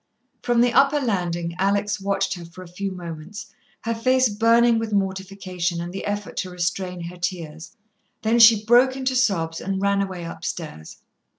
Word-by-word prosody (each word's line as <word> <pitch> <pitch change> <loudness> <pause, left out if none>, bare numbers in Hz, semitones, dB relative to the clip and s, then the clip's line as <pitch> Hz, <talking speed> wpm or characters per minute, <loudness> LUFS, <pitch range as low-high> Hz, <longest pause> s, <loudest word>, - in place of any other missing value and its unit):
From 240 -1 +2
the 240 0 +3
upper 280 +2 +4
landing 175 -8 -2
Alex 200 +1 0
watched 195 0 0
her 175 -2 -8
for 170 +2 -11
a - - -12
few 195 +3 -4
moments, 180 +4 -8 0.3
her 230 - -2
face 255 +2 +2
burning 230 +2 +4
with 225 -1 -4
mortification 190 -3 -2
and 175 +1 -5
the 195 - -5
effort 205 0 -4
to 185 - -2
restrain 180 0 -3
her 170 +1 -7
tears. 170 +1 -5 0.5
Then 225 +2 +2
she 220 -2 +7
broke 245 +3 +5
into 260 -1 -1
sobs 180 -10 0
and 195 0 -2
ran 200 0 +1
away 185 -3 -4
upstairs. 160 - -7
195 Hz, 170 wpm, -23 LUFS, 175-225 Hz, 0.5 s, she